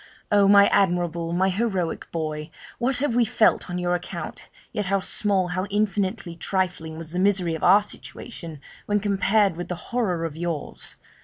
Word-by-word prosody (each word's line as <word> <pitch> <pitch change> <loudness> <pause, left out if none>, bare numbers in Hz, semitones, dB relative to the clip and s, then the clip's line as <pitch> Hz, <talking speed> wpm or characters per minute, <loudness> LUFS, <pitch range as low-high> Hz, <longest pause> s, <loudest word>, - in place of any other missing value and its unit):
Oh! 205 -1 +5
my 200 0 +8
admirable, 175 -3 +1
my 185 +2 +2
heroic 190 -4 -2
boy, 155 -2 -3 0.3
what 250 +2 +1
have 275 -2 0
we 240 0 +4
felt 225 -4 +2
on 180 - -3
your 180 0 0
account! 175 -2 -5 0.2
yet 210 -4 -1
how 195 +1 +2
small, 190 -1 0
how 185 +2 -1
infinitely 200 -4 -1
trifling 170 -3 -2
was 165 -1 -7
the 180 - -1
misery 185 -3 +2
of 160 - -5
our 205 +1 +6
situation 170 - -9 0.3
when 205 0 +2
compared 200 -1 +2
with 175 +1 -5
the 180 - -3 0.2
horror 185 -9 0
of 155 -2 -5
yours! 165 -2 -4
185 Hz, 170 wpm, -24 LUFS, 170-205 Hz, 0.3 s, my